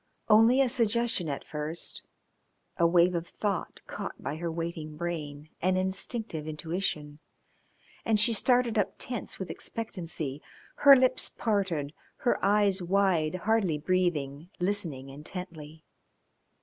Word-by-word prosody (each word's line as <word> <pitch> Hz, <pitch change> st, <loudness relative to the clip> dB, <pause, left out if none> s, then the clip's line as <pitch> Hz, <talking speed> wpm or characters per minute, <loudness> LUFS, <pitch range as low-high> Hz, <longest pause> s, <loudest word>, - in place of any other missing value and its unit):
Only 225 Hz, +5 st, +6 dB
a 270 Hz, -, +4 dB
suggestion 235 Hz, -, +1 dB
at 140 Hz, -, -4 dB
first 155 Hz, +2 st, -3 dB, 0.7 s
a 170 Hz, -, +3 dB
wave 175 Hz, +1 st, +4 dB
of 170 Hz, 0 st, -3 dB
thought 200 Hz, -2 st, -3 dB
caught -, -, -6 dB
by 150 Hz, -, -4 dB
her 170 Hz, 0 st, -3 dB
waiting 160 Hz, -2 st, -5 dB
brain, 155 Hz, -3 st, -5 dB
an 185 Hz, +1 st, +2 dB
instinctive 190 Hz, -3 st, -3 dB
intuition, 155 Hz, -1 st, -3 dB, 0.8 s
and 220 Hz, -2 st, +2 dB
she 220 Hz, +2 st, +5 dB
started 245 Hz, 0 st, +3 dB
up 200 Hz, -, -1 dB
tense 245 Hz, -4 st, -2 dB
with 190 Hz, -, -5 dB
expectancy, 165 Hz, -10 st, -5 dB, 0.4 s
her 280 Hz, -1 st, +9 dB
lips 255 Hz, -1 st, +2 dB
parted, 185 Hz, -10 st, -1 dB, 0.2 s
her 245 Hz, -, 0 dB
eyes 200 Hz, -1 st, +3 dB
wide, 180 Hz, -3 st, +1 dB
hardly 210 Hz, -8 st, +2 dB
breathing, 160 Hz, -3 st, -1 dB
listening 175 Hz, -8 st, -1 dB
intently. 155 Hz, +1 st, -8 dB
180 Hz, 125 wpm, -29 LUFS, 155-210 Hz, 0.8 s, her